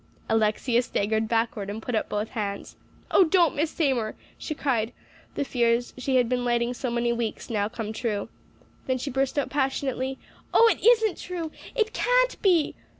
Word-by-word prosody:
Alexia 225 +2 +2
staggered 220 -2 0
backward 225 -3 -1
and 210 +2 -4
put 245 +2 -5
up 220 - 0
both 210 +1 -2
hands. 200 -4 -4 0.4
"Oh, - - +7
don't, 340 -2 +3
Miss 305 +2 +1
Seymour," 260 -10 0 0.2
she 310 - -5
cried, 240 -5 0 0.4
the 285 - -1
fears 240 -1 +1
she 260 +1 -1
had 250 -2 +4
been 250 0 0
lighting 240 0 +1
so 250 +1 -3
many 235 0 0
weeks 235 0 -4
now 205 -2 0
come 220 -1 -5
true. 215 -3 -2 0.6
Then 260 -1 +1
she 275 +3 -4
burst 270 +2 0
out 285 - 0
passionately, 265 -1 -1 0.4
"Oh, 460 - +8
it - - -4
isn't 445 -3 +4
true 340 -3 -5 0.2
it 445 -3 +1
can't - - +2
be!" 350 -6 +3
245 Hz, 175 wpm, -26 LUFS, 225-290 Hz, 0.6 s, Oh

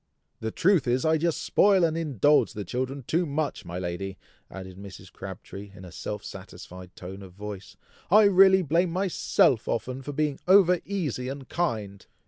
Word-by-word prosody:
"The 110 - -3
truth 180 - +2
is, 125 +5 +1
I 160 0 +3
just 170 0 -1
spoil 195 -3 +4
and 160 -1 +2
indulge 150 - +2
the 105 -2 -6
children 130 +6 -4
too 170 +8 0
much, 150 +1 -3
my 85 +1 -6
lady!" 90 +2 -4 0.3
added 95 -1 -9
Mrs. 95 -1 -11
Crabtree, 95 +1 -9
in 95 - -11
a 90 - -11
self 105 +4 -6
satisfied 90 -1 -11
tone 95 +2 -9
of 95 -2 -12
voice. 100 0 -9 0.3
"I 210 +4 +7
really 190 -1 +6
blame 170 +4 +1
myself 175 - +1
often 130 +3 -3
for 145 - -6
being 145 -1 -1
over 180 -2 +6
easy 150 - -3
and 135 -1 -7
kind." 110 - -3
130 Hz, 170 wpm, -26 LUFS, -, 0.3 s, I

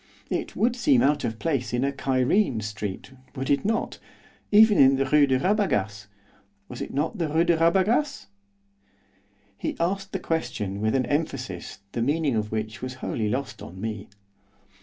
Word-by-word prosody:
It - - -3
would 235 +2 +1
seem 250 +1 +3
out 145 +1 +2
of 110 - -2
place 135 -4 -2
in 120 - 0
a 140 - +1
Cairene 135 - +1
street, 105 +1 -5 0.2
would 135 0 -2
it 140 - +2
not? 225 +2 -1 0.5
even 215 0 +6
in 135 0 +7
the 135 0 +1
Rue 145 +1 +4
de 130 -1 +2
Rabagas, 110 - 0 0.6
was - - -8
it - - -5
not 160 +9 -2
the 165 - 0
Rue 160 +3 +3
de 170 0 +3
Rabagas?' 195 - +2 1.3
He - - -4
asked 195 +3 -1
the - - -1
question 105 - -3
with 110 +2 +1
an 130 -1 +1
emphasis 130 - -3
the 115 - -3
meaning 145 +1 +1
of 105 -1 -2
which 110 0 -4
was 130 0 -5
wholly 110 -4 -2
lost 135 +4 -3
on 95 +2 -10
me. 105 -1 -5
140 Hz, 170 wpm, -25 LUFS, 110-175 Hz, 1.3 s, in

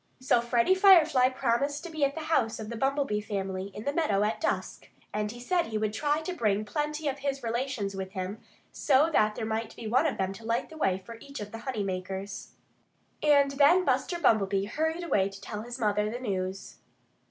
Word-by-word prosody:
So 255 -2 +3
Freddie 240 +7 +3
Firefly 330 -9 +6
promised 270 +4 -1
to 345 - -7
be 310 -2 -2
at 280 0 +2
the 320 - -4
house 310 -8 0
of 215 -1 -6
the - - -4
Bumblebee 270 -3 0
family, 195 -2 -3
in 205 +2 -9
the 285 - -1
meadow, 245 -12 +1
at 215 +2 -1
dusk. - - -2 0.2
And 210 0 -1
he 240 - -10
said 345 +8 0
he 220 - -2
would 215 -1 -1
try 295 +6 0
to 360 +3 -4
bring 215 - 0
plenty 300 +5 -2
of 280 0 -2
his 275 -1 -3
relations 235 -3 -2
with 190 0 -5
him, 190 +2 -4 0.3
so 295 +4 +3
that 215 -4 +3
there 225 - -3
might 220 +1 -3
be 230 - -9
one 255 +8 +3
of 295 - -2
them 190 0 -1
to 225 - -12
light 230 +1 -1
the - - -10
way 190 -11 +1
for 230 -1 -10
each 280 0 -9
of 205 0 -7
the 225 - -7
honey 220 -6 -2
makers. 190 +1 -5 0.7
And 285 -2 +4
then 295 +7 +5
Buster 350 - +1
Bumblebee 200 - +2
hurried 320 +9 -2
away 200 - +1
to 195 0 -11
tell 210 +1 -6
his 240 +2 -7
mother 210 -2 +1
the 235 - -4
news. 190 -5 -4
235 Hz, 215 wpm, -28 LUFS, 210-285 Hz, 0.7 s, Firefly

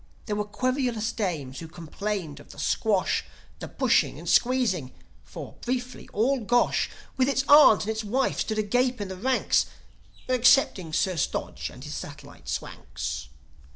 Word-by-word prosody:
There 210 - -2
were 210 0 -1
querulous 245 0 -1
dames 155 - -3
who 165 - -7
complained 175 0 -5
of - - -16
the - - -13
"squash," 205 -4 +1 0.4
The - - -6
pushing - - +2
and - - -10
squeezing; 235 - +2 0.3
for, - - -10
briefly, 250 0 -4
all 255 +6 +1
Gosh, 240 +2 +2 0.3
With 260 +1 +3
its 270 -1 +1
aunt 290 -8 +8
and 215 - -1
its 220 0 -3
wife, 250 +6 0
stood 220 - -1
agape 245 +4 +1
in 205 -2 -4
the 190 - -5
ranks 255 +7 +1 0.6
Excepting 250 - +4
Sir 180 +2 0
Stodge - - -2
and 125 - -12
his 150 0 -6
satellite 145 - -9
Swanks. 75 -2 -5
215 Hz, 155 wpm, -26 LUFS, 175-250 Hz, 0.6 s, aunt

